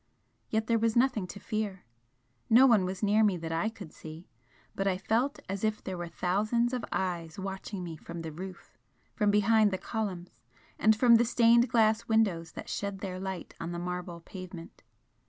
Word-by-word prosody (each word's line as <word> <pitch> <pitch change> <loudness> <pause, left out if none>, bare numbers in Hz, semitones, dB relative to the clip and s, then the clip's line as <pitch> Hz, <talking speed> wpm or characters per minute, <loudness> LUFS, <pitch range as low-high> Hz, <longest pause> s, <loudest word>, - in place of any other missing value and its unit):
Yet 220 0 0
there 230 0 +2
was 225 0 +1
nothing 240 -6 +2
to 200 - -9
fear. 210 -4 -3 0.6
No 245 +4 +8
one 220 -7 +5
was 185 +2 -4
near 210 +2 +4
me 200 -4 +3
that 165 -1 -5
I 165 +7 0
could 200 -8 -11
see, 160 +2 -10 0.5
but 195 - -1
I 185 -1 +1
felt 230 +8 0
as 195 +1 -4
if 215 0 0
there 190 - -4
were 175 -1 -5
thousands 215 +8 0
of 250 - -2
eyes 175 -2 -2
watching 195 0 -5
me 165 -2 -6
from 170 +2 -8
the 160 - -5
roof, 185 +3 -10 0.3
from 210 -3 +1
behind 210 +1 +4
the 190 - -2
columns, 190 -5 -4 0.5
and 220 0 +5
from 235 +1 +6
the 235 - +4
stained 235 0 +4
glass 220 -1 +3
windows 195 -8 +1
that - - -8
shed 200 -1 -4
their 185 -2 -4
light 190 -1 -5
on 170 +1 -4
the - - -4
marble 175 -1 -5
pavement. 180 -1 -10
195 Hz, 190 wpm, -30 LUFS, 180-220 Hz, 0.6 s, No